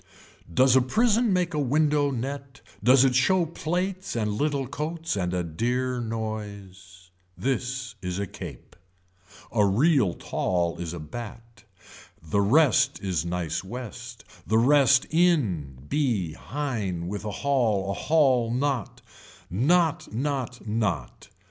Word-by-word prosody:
Does 130 +8 +4
a 130 - +6
prison 225 - +2
make 180 -2 +1
a 150 - -1
window 145 +1 +2
net 135 +1 -5 0.2
does 130 +3 +6
it 130 - +3
show 170 +8 +3
plates 180 +3 -3
and 105 -3 0
little 140 +3 0
coats 160 +4 -3
and 90 -3 -1
a 90 -1 -1
dear 125 +9 -1
noise. 100 -5 -7 0.3
This 125 +2 -2
is 90 -1 -3
a 100 - -1
cape. - - -10 0.8
A 110 -2 +3
real 110 - +3
tall 85 -2 -1
is 85 -1 -4
a - - -6
bat, 115 +8 -9 0.5
the 80 +6 0
rest 130 +6 +3
is 90 -6 -2
nice 85 -2 -2
west, 120 +1 -8 0.2
the 110 - +3
rest 135 +2 +5
in, 120 - +1
be 115 - 0
hine 105 - -3
with 100 +2 -4
a 105 - -3
haul 110 -6 0
a - - -1
haul 130 -4 +2
not. 130 -2 -2 0.5
Knot 160 - +2
not 125 0 -3
knot. 105 - -2
120 Hz, 130 wpm, -26 LUFS, 100-145 Hz, 0.8 s, a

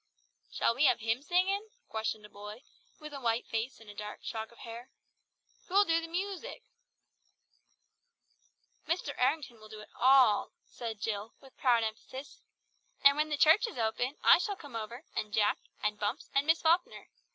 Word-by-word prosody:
"Shall - - +1
we 270 +6 +2
have 250 -3 +4
hymn 225 +3 0
singin'?" 385 +7 +1 0.2
questioned 220 -1 -3
a - - -13
boy, 210 +4 -10 0.4
with 305 -1 -9
a 275 - -7
white 230 -1 0
face 225 +3 -3
and 210 -2 -13
dark 210 0 -7
shock 220 -1 -5
of 235 - -19
hair. 235 +2 -9 0.8
"Who'll 400 +2 +4
do 330 -1 +2
the 330 - -6
moosic?" 395 +8 -4 2.2
"Mr. 330 -4 -1
Errington 260 -2 0
will 215 0 -14
do 215 0 -9
it - - -14
all," 255 -4 +5
said 225 -3 -7
Jill 215 0 -3
with 270 -2 -18
proud 240 -3 +3
emphasis. 245 +5 -7 0.6
"And 280 0 +8
when 305 +1 0
the 300 - -1
church 320 +11 +6
is 450 - -9
open, 240 +4 -1
I - - +8
shall 405 +2 -2
come 285 -9 -11
over, 230 +5 -6
and 215 - -2
Jack, 210 -1 +2 0.2
and 210 0 0
Bumps, 215 +7 -3
and 275 +2 +2
Miss 320 +1 +3
Falkner. 335 +2 +1
250 Hz, 170 wpm, -31 LUFS, 220-310 Hz, 2.2 s, And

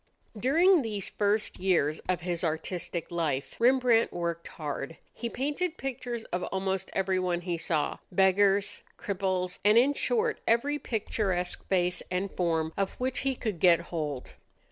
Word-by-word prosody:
During 320 - +4
these 210 -5 -4
first 210 +1 0
years 165 -5 +2
of 180 -1 +1
his 175 0 -2
artistic 170 +1 -3
life, 150 -5 -1
Rembrandt 245 -2 +4
worked 170 -1 -3
hard. 150 0 -5 0.2
He 235 - -4
painted 295 +8 -2
pictures 245 -3 -4
of 180 - 0
almost 190 0 -2
everyone 185 -2 0
he 175 -1 -2
saw 160 -2 0
beggars, 195 +2 +3 0.2
cripples, 185 -2 -2
and 210 +2 +5
in 265 +4 +5
short 455 - 0
every 280 +6 +2
picturesque 195 -6 -2
face 180 -1 +1
and 185 +2 -1
form 160 -2 0
of 195 -1 -1
which 255 +1 -1
he 270 -1 0
could 215 -8 -3
get 175 -2 +6
hold. 155 -6 -4
190 Hz, 145 wpm, -29 LUFS, 175-235 Hz, 0.2 s, get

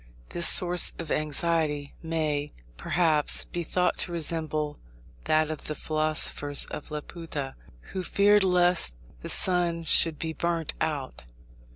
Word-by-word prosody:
This 170 - +2
source 180 -1 +5
of 155 - -6
anxiety 155 -1 0
may, 155 -3 -2 0.2
perhaps, 155 - +1
be 175 - -5
thought 180 +2 0
to 175 - +2
resemble 155 -2 -2 0.5
that 155 0 +2
of 155 - -7
the 155 - -3
philosophers 155 -2 0
of 150 - -7
Laputa, 150 -2 -6 0.4
who 190 - -2
feared 205 +2 +3
lest 180 - +4 0.3
the - - -6
sun 175 -2 +1
should 165 -1 +3
be 160 -1 -4
burnt 165 0 -2
out. 145 - -3
160 Hz, 130 wpm, -27 LUFS, 150-170 Hz, 0.5 s, source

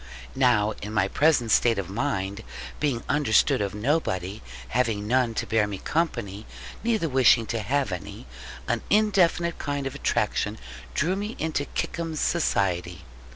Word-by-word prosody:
Now 120 -5 +3
in 105 +1 -6
my 100 -2 +3
present 135 -2 +2
state 115 0 +4
of 100 -3 -3
mind, 100 -2 -2 0.4
being 135 -6 0
understood 145 -8 +3
of 100 -1 -2
nobody, 105 - -1 0.3
having 110 - 0
none 120 -1 +2
to - - -1
bear 110 -2 +2
me 100 -1 -5
company, 115 - -2 0.4
neither 220 -7 +1
wishing 130 -4 +4
to 115 +1 -2
have 135 +6 0
any, 90 -6 -7 0.4
an - - 0
indefinite 185 -5 +2
kind 145 -1 -3
of 135 - -3
attraction - - -1 0.4
drew 180 +5 +1
me 210 +3 -4
into 155 -2 -1
Kickum's 165 0 -3
society. 90 - 0
120 Hz, 145 wpm, -26 LUFS, 105-155 Hz, 0.4 s, state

